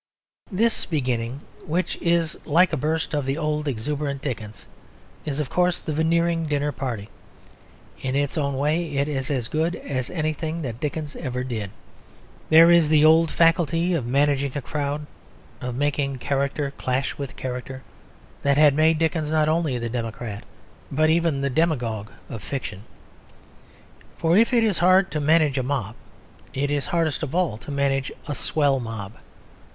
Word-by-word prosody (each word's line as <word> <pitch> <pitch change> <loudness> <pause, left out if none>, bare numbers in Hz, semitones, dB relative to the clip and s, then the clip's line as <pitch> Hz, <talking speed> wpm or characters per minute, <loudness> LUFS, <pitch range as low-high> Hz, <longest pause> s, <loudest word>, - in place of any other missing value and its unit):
This 225 +4 +1
beginning, 125 -4 -2 0.3
which 175 +4 -1
is 170 -1 +1
like 170 +3 +3
a - - +3
burst 155 +3 -1
of 145 -1 0
the 135 +2 0
old 150 -1 -1
exuberant 140 +3 -3
Dickens, 110 -6 -5 0.6
is, 145 -1 -3
of 145 -4 -3
course, 180 0 +2
the 155 - -4
Veneering 165 +1 +1
dinner 145 0 0
party. 125 -7 -4 0.9
In 130 0 -2
its 145 0 0
own 140 -4 -1
way 155 +3 0
it 140 +1 +1
is 135 -2 -3
as 130 -6 -1
good 160 +5 0
as 130 -3 -3
anything 160 0 -2
that 120 -3 -5
Dickens 150 0 -4
ever 125 -4 -3
did. 110 -6 -4 0.8
There 165 +2 +8
is 170 -3 +5
the 155 -1 +5
old 160 +1 +6
faculty 165 +2 +2
of 140 -9 -1
managing 140 +1 +2
a 145 - -2
crowd, 145 +1 -3 0.6
of 125 -1 -4
making 140 0 0
character 140 +2 -1
clash 130 +1 -1
with 140 -2 -5
character, 130 +1 -5 0.6
that 140 0 +2
had 150 -2 +6
made 155 +2 +4
Dickens 160 -1 0
not 155 -1 +3
only 155 -5 +1
the 120 0 -3
democrat 115 -2 -5 0.5
but 155 +3 +3
even 165 -4 +1
the 140 - 0
demagogue 120 -9 0 0.2
of 115 - -7
fiction. 105 -5 -5 1.3
For 165 +1 +2
if 230 +5 +5
it 235 -2 +4
is 210 -5 +1
hard 185 +2 +4
to 155 - -1
manage 150 -2 +3
a - - +1
mob, 125 -5 -2 0.6
it 140 +2 0
is 145 -1 -1
hardest 165 -4 0
of 155 0 -4
all 175 -12 0
to - - -11
manage 140 -1 0 0.2
a 145 - -2
swell 140 -1 +1
mob. 110 -4 -6
145 Hz, 165 wpm, -24 LUFS, 130-160 Hz, 1.3 s, There